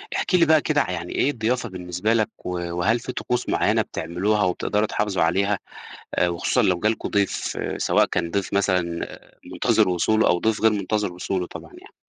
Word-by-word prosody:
احكِ 185 - 0
لي 170 - +5
بقى 155 -1 +5
كده 150 -2 +1
يعني 85 -1 -4
إيه - - +2
الضيافة 120 -1 -1
بالنسبة 90 +3 -2
لك 110 -2 +1 0.2
و - - -3 0.3
وهل 110 +7 +2
في 125 - -6
طقوس 125 0 -2
معيّنة - - +2
بتعملوها 95 +6 -1
وبتقدَروا 105 +3 0
تحافظوا 105 -5 0
عليها 100 +5 +1 0.6
آآ، 90 - +3
وخصوصًا 85 -1 +1
لو 90 -2 +2
جا 105 - +2
لكم 110 - -3
ضيف 100 -2 -1 0.2
سواء - - +3
كان 85 - -2
ضيف 100 +1 -2
مثلًا 95 -2 +2 0.7
مُنتظِر - - +2
وصوله 110 +5 +2
أو 90 - +2
ضيف 110 +2 0
غير 110 - +5
مُنتظِر 105 -1 -1
وصوله 90 0 -3
طبعًا - - -10
يعني؟ - - -16
100 Hz, 185 wpm, -23 LUFS, 90-110 Hz, 0.7 s, لي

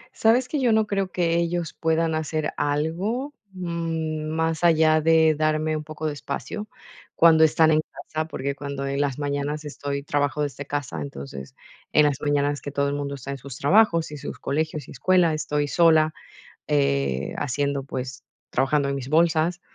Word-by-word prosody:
Sabes 240 +3 +3
que 295 - -2
yo 245 -3 +3
no 220 -1 +3
creo 195 -2 -2
que 170 -2 +1
ellos 170 -1 -1
puedan 160 0 0
hacer 155 -1 -2
algo, 175 - -1 0.2
mm, 165 -3 -3
más 160 +1 -1
allá 160 -2 +5
de 160 0 +5
darme 155 +1 0
un 155 - -4
poco 155 0 -7
de 150 - 0
espacio 145 - -5 0.5
cuando 160 -1 +6
están 160 0 +4
en 155 0 +3
casa, 155 0 -4
porque 140 -2 -3
cuando 140 0 -5
en 140 +1 -1
las 140 -2 -1
mañanas 145 +1 -2
estoy 140 -1 -4
trabajo 145 0 0
desde 145 0 -5
casa. 135 - -3
Entonces, 70 -1 -8 0.4
en 150 - +6
las 145 -2 0
mañanas 145 0 0
que - - -5
todo 140 0 0
el - - -2
mundo 140 -1 -3
está 140 +1 -7
en 140 - -4
sus 135 0 -9
trabajos, 165 0 +3
y 150 - -6
sus 145 - -7
colegios, 155 +1 -2
y - - -11
escuela, 175 +3 +3
estoy 150 -1 -1
sola, 160 -1 +4 0.5
eh, 70 -1 0
haciendo, 140 0 -1
pues 130 -1 -6 0.3
trabajando 140 +2 +1
en 140 - -1
mis 130 -1 -6
bolsas. 165 +2 +2
155 Hz, 175 wpm, -24 LUFS, 140-165 Hz, 0.5 s, cuando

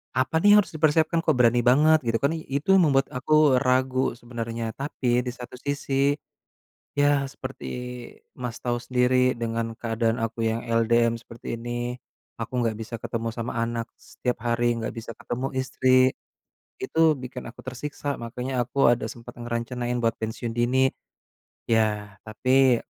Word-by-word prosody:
Apa 130 +5 +1
nih 205 +2 +7
yang - - +8
harus - - -15
dipersiapkan? 155 +1 +2
Kok 155 -3 +2
berani 120 0 +4
banget 150 +6 +5
gitu 115 0 +2
kan 140 - +3
i 165 - -4
itu 140 +7 0
membuat 140 -6 +3
aku 140 0 +4
ragu 130 -1 +1
sebenernya 115 -1 -5
tapi 125 -3 0
di 125 - -2
satu 125 0 -9
sisi. 140 0 0 0.8
Ya 145 -1 +3
seperti 135 -1 -8 0.7
Mas 125 -3 -5
tau 120 -1 0
sendiri 125 0 +2
dengan 115 -1 -3
keadaan 115 0 0
aku 115 0 -3
yang 115 +1 -2
LDM 115 0 +3
seperti 115 0 -8
ini, 120 +1 -3 0.5
aku 115 +2 -5
gak 115 - +1
bisa 110 +1 -5
ketemu 115 0 -4
sama 115 +1 -3
anak, 115 0 -1 0.2
setiap 125 -1 -4
hari 120 0 +1
gak 115 - -4
bisa 115 0 -6
ketemu 125 +4 -4
istri, 130 0 +3 0.7
itu 160 -1 +3
bikin 125 -2 -8
aku 120 - -10
tersiksa 140 +2 -4
makanya 125 +2 -4
aku 125 0 +3
ada 120 +2 +1
sempet 120 +1 -10
ngerencanain 120 +1 -3
buat 115 0 +1
pensiun 110 +1 -4
dini, 125 +3 +2 0.8
ya 105 -2 +1
tapi 130 +3 +3
125 Hz, 150 wpm, -25 LUFS, 115-135 Hz, 0.8 s, yang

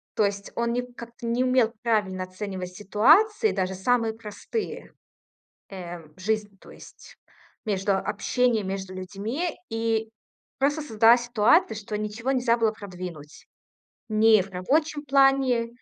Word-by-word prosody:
то 215 - +3
есть 200 0 -4
он 235 0 0
не 245 +1 -1
как-то 235 0 -10
не 235 +2 +1
умел 255 -3 +2
правильно 205 -6 0
оценивать 185 0 -6
ситуации, 320 - +4
даже 190 0 -1
самые 225 +4 +1
простые, 230 - -6 0.8
э, 175 -3 -7 0.2
жизнь, 210 +1 -2
то - - -15
есть, - - -15 0.5
между 200 -2 0
общением, 235 0 0
между 190 -1 -5
людьми. 210 - -4
И 225 -1 -1 0.5
просто 290 +3 +1
создалась 230 -2 +4
ситуация, 225 -1 +3
что 210 0 -5
ничего 215 +4 -3
нельзя 250 -3 +2
было 225 -2 +2
продвинуть. 180 -7 -9 0.6
Ни 215 -1 +5
в 195 - -12
рабочем 290 - 0
плане, 270 -3 +3
220 Hz, 130 wpm, -25 LUFS, 195-245 Hz, 0.8 s, Ни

